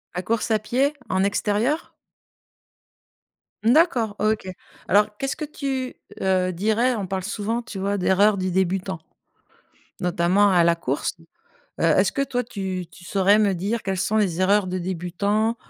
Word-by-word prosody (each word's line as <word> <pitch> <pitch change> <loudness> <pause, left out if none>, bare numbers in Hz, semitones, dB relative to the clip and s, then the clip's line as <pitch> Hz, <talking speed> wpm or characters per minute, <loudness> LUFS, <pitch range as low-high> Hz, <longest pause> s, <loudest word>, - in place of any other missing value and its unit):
La 180 - -1
course 225 +4 -1
à 215 - +3
pied? 260 +7 0 0.2
En 190 0 +1
extérieur? 210 +8 0 1.7
Mmh 230 - +5
d'accord, 245 - +3
OK. 215 -2 0 0.4
Alors 210 +1 +3
qu'est-ce 270 0 -2
que 305 - -3
tu, 270 -3 -4 0.3
heu, 185 -1 +1
dirais? 220 +7 +1
On 200 -3 -3
parle 190 0 -3
souvent, 220 +3 -2
tu 230 -5 -8
vois, 200 +1 -1
d'erreurs 200 +2 +3
du 185 -1 -1
débutant. 185 0 -1 1.0
Notamment 180 +3 +3
à 175 - +5
la 170 0 +3
course, 145 +2 -2 0.6
heu, - - +1
est-ce 180 +4 +4
que 275 - 0
toi, 250 -2 -1
tu 190 -6 -5
tu 180 0 -15
saurais 195 +3 +3
me 205 -3 +2
dire 205 +6 -2
quelles 195 -1 -2
sont 210 +4 0
les 185 -5 +1
erreurs 200 +1 +3
de 185 0 -3
débutant, 190 +5 -1
200 Hz, 160 wpm, -23 LUFS, 185-220 Hz, 1.7 s, Mmh